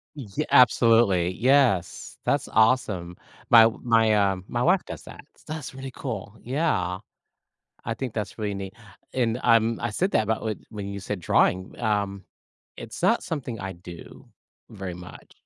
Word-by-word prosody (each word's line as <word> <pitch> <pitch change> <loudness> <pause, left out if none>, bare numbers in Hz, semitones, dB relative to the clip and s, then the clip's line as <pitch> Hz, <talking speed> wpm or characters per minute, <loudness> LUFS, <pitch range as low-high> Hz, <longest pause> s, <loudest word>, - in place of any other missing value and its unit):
Ye 110 -10 -4
absolutely. 115 -8 +5
Yes, 125 -8 +1
that's - - +1
awesome. 110 -6 +2 0.3
My 115 -1 +8 0.2
my, 115 -2 +3
uh 100 -2 +2
my 120 0 -1
wife 180 +4 +3
does - - -8
that, - - -12
so 155 - -9
that's 155 -5 -7
really 135 0 -7
cool, 110 -4 -6
yeah. 120 - -1 0.8
I 115 - -3
think 125 -2 -5
that's 105 -2 -4
really 105 -2 -2
neat, 95 +1 -7 0.4
and, 120 -2 0
um, 115 -1 +3
I 120 - -1
said 185 - -1
that - - +3
about 110 0 -2
when 105 -2 -6
you 100 0 -5
said 100 0 -4
drawing, 95 +2 +1
um, 100 -2 -1 0.5
it's - - -8
not - - +2
something 125 -8 -5
I 95 0 -5
do 85 -1 -12 0.4
very 95 -4 -6
much. 90 0 -12
110 Hz, 155 wpm, -25 LUFS, 95-125 Hz, 0.8 s, My